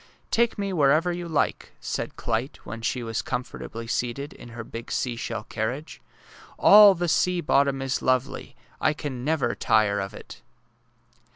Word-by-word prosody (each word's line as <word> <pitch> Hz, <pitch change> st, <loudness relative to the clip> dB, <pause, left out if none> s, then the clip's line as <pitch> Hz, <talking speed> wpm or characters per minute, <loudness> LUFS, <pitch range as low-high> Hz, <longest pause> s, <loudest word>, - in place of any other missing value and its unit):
*^ -, -, -25 dB, 0.3 s
Take 235 Hz, 0 st, +2 dB
me 200 Hz, -1 st, -2 dB
wherever 155 Hz, +2 st, +3 dB
you 175 Hz, 0 st, -4 dB
like," 155 Hz, -3 st, -1 dB
said -, -, -4 dB
Clyte, 115 Hz, +4 st, -2 dB
when 115 Hz, -, -7 dB
she 120 Hz, +2 st, -2 dB
was 115 Hz, -1 st, -2 dB
comfortably 120 Hz, -2 st, -5 dB
seated 125 Hz, +4 st, -3 dB
in 120 Hz, -, -12 dB
her 115 Hz, 0 st, -7 dB
big 115 Hz, +1 st, -8 dB
seashell 115 Hz, -3 st, -3 dB
carriage. 120 Hz, +9 st, -4 dB, 0.3 s
'' -, -, -20 dB, 0.2 s
All 205 Hz, -1 st, +8 dB
the 175 Hz, 0 st, -1 dB
sea 180 Hz, +2 st, +2 dB
bottom 140 Hz, -4 st, +2 dB
is 135 Hz, -1 st, -1 dB
lovely. 130 Hz, +1 st, -1 dB, 0.2 s
I 155 Hz, -, +2 dB
can 135 Hz, -5 st, -5 dB
never 145 Hz, -4 st, +1 dB
tire 105 Hz, -2 st, +2 dB
of 100 Hz, 0 st, -5 dB
it! -, -, -11 dB
130 Hz, 165 wpm, -25 LUFS, 115-160 Hz, 0.3 s, All